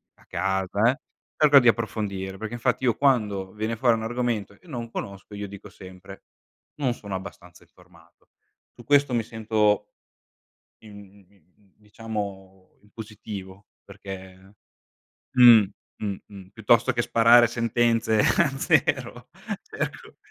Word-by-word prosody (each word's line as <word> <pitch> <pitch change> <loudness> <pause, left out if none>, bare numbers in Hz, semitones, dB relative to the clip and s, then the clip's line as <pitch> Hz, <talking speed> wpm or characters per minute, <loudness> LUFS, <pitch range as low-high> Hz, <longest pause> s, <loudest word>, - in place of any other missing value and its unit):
a - - -25
casa, 95 +5 0
eh, 135 - -8 0.4
cerco 145 -2 +7
di 120 -2 +5
approfondire. 100 -4 -3
Perché, 110 +2 -6
infatti 120 +2 -1
io 120 -4 +2
quando 105 -9 0
viene 110 +2 -3
fuori 120 0 +3
un 110 - -5
argomento 120 -3 -3
e 180 - -23
non 120 -6 -6
conosco 100 0 -7
io 100 0 -5
dico 100 +1 -11
sempre: 95 0 -13 0.6
"Non 130 -4 0
sono 100 -4 -7
abbastanza 95 -2 -10
informato." - - -23 0.5
Su 120 - -15
questo 145 0 +3
mi 115 -1 +1
sento 105 -2 0 0.9
in 100 -2 -15
in 95 +1 -31
diciamo 100 -3 -8
in 105 - -25
positivo, 105 -3 -9 0.2
perché 95 -1 -11 0.8
mh, 120 -4 +8 0.3
mh, 100 -2 -3
mh, 100 -2 -12
piuttosto 115 +5 +2
che 120 -1 0
sparare 120 +1 +5
sentenze 115 -1 +1
a 170 +8 +3
zero - - 0 0.4
cerco, - - -6
105 Hz, 130 wpm, -25 LUFS, 95-115 Hz, 0.9 s, mh